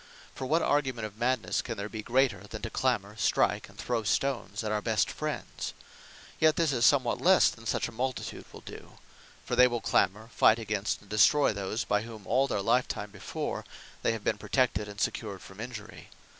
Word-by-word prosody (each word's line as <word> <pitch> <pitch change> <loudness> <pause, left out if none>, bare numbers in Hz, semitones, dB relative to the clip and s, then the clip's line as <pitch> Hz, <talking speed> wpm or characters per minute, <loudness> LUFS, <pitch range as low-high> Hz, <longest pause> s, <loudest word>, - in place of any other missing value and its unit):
For 130 - -5
what 160 +4 +2
argument 130 -6 +1
of 105 +1 -9
Madnesse 125 0 +1
can 115 -2 -5
there 100 +1 -3
be 110 0 -6
greater, 120 -4 +1
than 110 +1 -8
to 115 - -4
clamour, 105 -6 0
strike, 105 - +1
and - - -18
throw 120 -2 -1
stones 110 -1 -1
at 105 - -2
our 105 -1 0
best - - +1
friends? - - -5 0.6
Yet 155 -1 +5
this 160 -4 +2
is 120 -2 +4
somewhat 130 -4 +2
lesse 185 +1 +6
than 115 0 -10
such - - 0
a - - -9
multitude 125 +2 -4
will - - -11
do. - - -11 0.5
For - - -1
they 125 - +7
will 120 -1 -2
clamour, 110 +1 +1
fight 110 - +6
against, 105 -2 -2
and 105 - -19
destroy 140 +5 +5
those, 100 +2 -2
by 105 - +1
whom 110 -3 -9
all 130 +6 +2
their 100 -6 -1
lifetime 105 -3 0
before, 100 - -4 0.4
they - - +2
have 110 -2 -6
been - - 0
protected, 125 -5 +1
and 100 0 -9
secured 105 -4 -2
from 95 +1 -13
injury. 110 -2 -8
115 Hz, 200 wpm, -29 LUFS, 105-130 Hz, 0.6 s, they